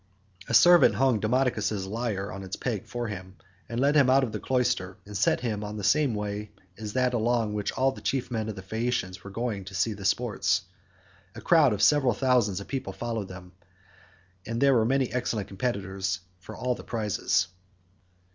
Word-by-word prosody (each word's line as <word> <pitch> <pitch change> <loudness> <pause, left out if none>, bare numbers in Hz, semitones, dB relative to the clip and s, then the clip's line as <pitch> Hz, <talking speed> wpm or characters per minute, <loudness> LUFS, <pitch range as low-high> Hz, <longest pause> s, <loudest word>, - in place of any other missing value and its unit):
A 115 - +2
servant 175 +9 +7
hung 130 -4 +3
Demodocus's 110 -4 0
lyre 105 -1 -3
on 95 - -7
its 95 -1 -5
peg 110 -7 -3
for 120 -1 -4
him, 95 -2 -7 0.3
led 130 +5 +2
him 140 -4 +5
out 135 +1 +5
of 120 - -2
the 105 - -4
cloister, 110 -8 0
and 105 0 -10
set 95 - +2
him 110 -4 -2
on 105 +1 -5
the 105 - -5
same 135 +4 +3
way 105 0 -4 0.3
as 105 0 -7
that 125 -1 +1
along 115 -2 +1
which 105 -1 -2
all 135 0 +2
the - - -11
chief 130 -2 -2
men 110 -2 -2
of 110 - -5
the 95 - -8
Phaeacians 105 -3 -2
were 95 - -8
going 110 -1 -3
to 95 0 -9
see 100 +4 +1
the 100 -1 -10
sports; 100 -3 +1 0.7
a - - -7
crowd 160 -6 +5
of 105 -1 0
several 135 +1 +4
thousands 125 -8 +2
of 100 - -9
people 135 -1 -4
followed 115 -4 -4
them, 90 -1 -11 0.9
and 115 +3 -4
there 140 +1 +5
were 115 -3 +3
many 130 +1 +1
excellent 120 -5 -2
competitors 95 -3 -2 0.2
for 95 - -10
all 125 0 0
the - - -9
prizes. 110 -4 0
110 Hz, 195 wpm, -27 LUFS, 100-125 Hz, 0.9 s, servant